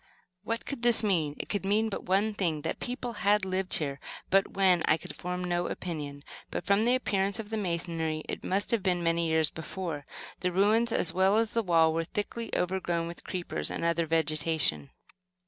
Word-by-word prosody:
What 230 +2 -3
could 280 -4 -5
this 240 -2 +5
mean? 165 -8 +1
It - - -5
could 205 - -2
mean 210 +3 +2
but 215 - -4
one 200 +4 +2
thing; 170 -7 -1
that - - -3
people 245 -1 -4
had 205 0 +3
lived 190 0 0
here. 140 -3 -1 0.3
But 195 +1 +3
when, 185 -3 +4
I 155 - +4
could - - -9
form 180 0 -4
no 175 0 0
opinion; 145 -5 -5 0.3
but - - -3
from 200 +3 +3
the 245 +1 +4
appearance 200 -5 0
of 220 -1 -6
the 220 - -1
masonry 170 -4 -2
it - - -5
must 195 +2 0
have 230 -3 +2
been 180 -2 0
many 165 0 +2
years 160 -1 +2
before. 160 -3 -5 0.3
The 180 - 0
ruins, 215 +5 +3
as 180 - +1
well 190 +3 +4
as 225 -1 +2
the 230 - +1
wall, 165 -5 +4
were 165 +1 0
thickly 220 +5 -4
overgrown 175 -2 0
with 170 +1 -8
creepers 180 -2 -3
and - - -3
other 170 0 +1
vegetation. 155 - +1
180 Hz, 200 wpm, -29 LUFS, 165-205 Hz, 0.3 s, this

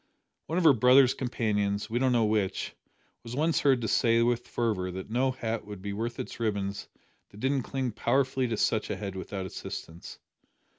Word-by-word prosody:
One 165 - -2
of 180 - +2
her 155 -3 +8
brother's 125 +2 +6
companions 105 -5 -1
we 120 +2 -1
don't 130 0 +2
know 120 -2 +3
which 105 -3 -1 0.5
was 115 +1 -7
once 160 +3 +2
heard 135 -3 +3
to 110 - -1
say 115 0 +3
with 120 0 0
fervour 105 -6 -1
that 95 +3 -7
no 130 +3 +2
hat 115 -4 -3
would 105 -2 -7
be 100 0 -3
worth 115 +3 -4
its - - -6
ribbons 100 -3 -2 0.4
that 105 - -14
didn't 135 +2 +1
cling 130 0 -3
powerfully 130 +3 +1
to 115 -2 -2
such 110 +1 +1
a - - -1
head 100 -2 -5
without 95 0 -5
assistance! 85 -2 -8
115 Hz, 190 wpm, -28 LUFS, 105-130 Hz, 0.5 s, her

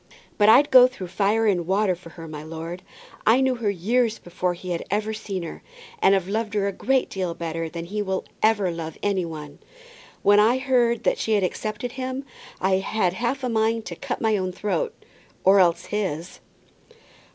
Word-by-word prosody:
"But 205 +1 +6
I'd 275 +6 +6
go 255 -1 +9
through 195 -8 -8
fire 205 +4 +1
and 180 -5 +1
water 195 0 +2
for 175 -1 -11
her, 165 -1 -8
my 150 -1 -7
lord. 165 +3 -7 0.4
I 230 +4 +5
knew 265 -1 +2
her 225 -3 0
years 225 +5 +1
before 175 0 -3
he 180 +1 -7
had 170 - -2
ever 215 +2 -1
seen 200 -4 -5
her, 165 - -8 0.4
and 195 +1 +5
have 190 -2 -1
loved 215 +1 -2
her 200 -1 +1
a - - 0
great 265 +6 +1
deal 185 -3 -3
better 165 -1 -4
than 170 +1 -6
he 210 +4 -3
will 190 -2 -2 0.2
ever 210 -4 +3
love 160 -1 -6
any 195 -3 +1
one. 150 -3 -8 0.6
When 205 +1 +6
I 225 +4 +4
heard 245 -3 +1
that - - +1
she 220 - 0
had 205 -2 +2
accepted 215 +5 -3
him, 260 +1 -4 0.3
I 190 0 +2
had 190 -2 0
half 245 +6 -2
a - - 0
mind 225 0 +1
to 170 - -6
cut - - -5
my 220 -2 +2
own 185 -1 -2
throat, 320 - -2 0.5
or 195 +1 +6
else 175 -2 +3
his." 185 -5 -3
200 Hz, 195 wpm, -24 LUFS, 175-225 Hz, 0.6 s, go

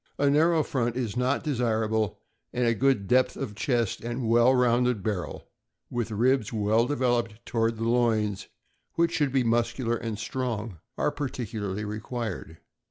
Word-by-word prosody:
A 140 0 +3
narrow 160 +2 +4
front 120 -4 -1
is 120 -4 -2
not 125 +3 +1
desirable, 110 - 0 0.3
and 125 0 0
a 115 - +3
good 125 -4 +1
depth 130 +5 +3
of 130 -7 -4
chest 115 0 0
and 120 +1 -3
well 120 +2 +5
rounded 125 -3 +2
barrel, 100 -4 -3 0.4
with 120 -2 -2
ribs 120 +2 +1
well 110 +1 +2
developed 120 -5 0
toward 115 -1 0
the 115 +1 -2
loins, 110 -4 +1 0.5
which 170 0 +2
should 145 -3 +1
be 135 -1 +2
muscular 120 +1 +1
and 115 -2 -4
strong, 115 -5 -3 0.2
are - - +1
partic 130 -6 -4
ularly 105 -1 -3
required. 110 -4 -5
120 Hz, 155 wpm, -27 LUFS, 110-125 Hz, 0.5 s, well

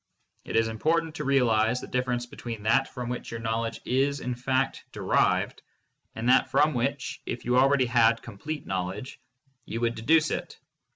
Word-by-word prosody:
It - - -5
is 115 0 +3
important 160 +8 0
to - - -5
realize 125 -3 +3
the - - -7
difference 125 -1 -1
between 115 -3 -7
that 135 +5 +3
from 125 -2 -6
which 125 0 -4
your 115 - -5
knowledge 115 0 -2
is, 140 +2 +1
in 125 - -3
fact, 130 +2 -1
derived, - - +1 0.5
and 115 +2 -3
that 130 +1 +4
from 150 +1 +3
which, 135 +3 -2
if 120 - -4
you 125 +1 +2
already 135 +1 +4
had 115 -1 +3
complete 145 +8 -6
knowledge, 95 +6 -4 0.5
you 115 - -4
would 120 0 +1
deduce 155 +7 +3
it. - - -4
125 Hz, 170 wpm, -27 LUFS, 115-135 Hz, 0.5 s, that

